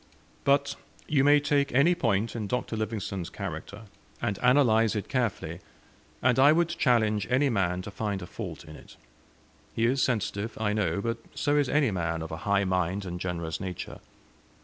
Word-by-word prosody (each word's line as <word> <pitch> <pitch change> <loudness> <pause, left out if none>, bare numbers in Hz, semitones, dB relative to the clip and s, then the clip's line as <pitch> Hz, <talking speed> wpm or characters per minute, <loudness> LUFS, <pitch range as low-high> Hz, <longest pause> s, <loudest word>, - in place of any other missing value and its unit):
But 140 0 +2 0.3
you 140 -3 +3
may 145 +1 +6
take 145 -1 +1
any 145 +7 +5
point 110 - 0
in 110 -3 -3
Dr. 125 0 -2
Livingstone's 105 -4 -3
character, 105 +3 -7 0.4
and 100 - -2
analyse 115 -4 +4
it 105 - -3
carefully, 120 -6 -2 0.6
and 125 0 +3
I 140 +3 +7
would 170 +1 +2
challenge 115 - +2
any 135 +2 +3
man 90 -4 0
to 100 - -7
find 100 -1 -3
a - - -5
fault 90 -5 -7
in 75 -1 -11
it. - - -14 0.8
He 115 - +2
is 130 +3 +2
sensitive, 110 -3 -1
I 105 -1 0
know; 100 -1 0
but 115 +2 -2 0.2
so 145 0 +1
is 145 -3 +2
any 145 -6 +2
man 85 -3 -2
of 80 - -7
a 80 - -4
high 100 0 +3
mind 95 +1 -1
and 90 -1 -5
generous 85 -2 -3
nature. 95 -3 -6
110 Hz, 175 wpm, -28 LUFS, 95-135 Hz, 0.8 s, I